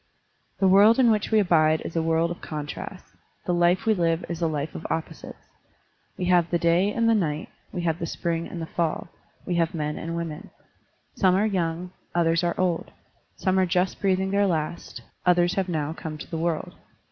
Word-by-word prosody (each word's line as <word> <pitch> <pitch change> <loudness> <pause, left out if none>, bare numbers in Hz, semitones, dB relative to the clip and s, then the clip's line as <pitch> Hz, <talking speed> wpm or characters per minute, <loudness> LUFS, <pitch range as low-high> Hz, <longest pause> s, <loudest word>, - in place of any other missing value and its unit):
The 195 - +3
world 205 +4 +6
in 245 -3 +5
which 210 -1 0
we 220 - +3
abide 160 -5 +3
is 165 - -7
a 165 - +2
world 165 +1 +1
of 175 - -7
contrasts; 150 -1 -7 0.3
the 180 - 0
life 175 +3 +2
we 220 - +4
live 165 -3 0
is 170 0 -5
a 165 - +2
life 150 -1 -3
of - - -6
opposites. 160 0 -5 0.7
We 180 - -2
have 175 -2 +3
the 175 - +2
day 170 +4 +2
and 230 +1 +1
the 230 - +5
night, 160 -8 -1 0.2
we 175 - -3
have 165 0 0
the 170 - -3
spring 170 0 -2
and 175 - -7
the 165 - -3
fall, 165 0 -2 0.4
we 180 - -2
have 165 0 +1
men 150 -1 -2
and 165 +1 -4
women. 165 -3 -5 0.6
Some 185 -2 +3
are 205 +3 +2
yovmg, 175 -2 -2 0.2
others 165 -1 +2
are 175 - -1
old; 180 -3 0 0.5
some 190 -1 +1
are 185 - +3
just 180 +1 0
breathing 190 -1 +1
their 200 0 +3
last, 160 -1 -3 0.2
others 175 0 +3
have 190 -2 -1
now 155 -2 -1
come 160 -1 -6
to - - -10
the - - -3
world. 165 -1 -2
170 Hz, 205 wpm, -25 LUFS, 165-185 Hz, 0.7 s, world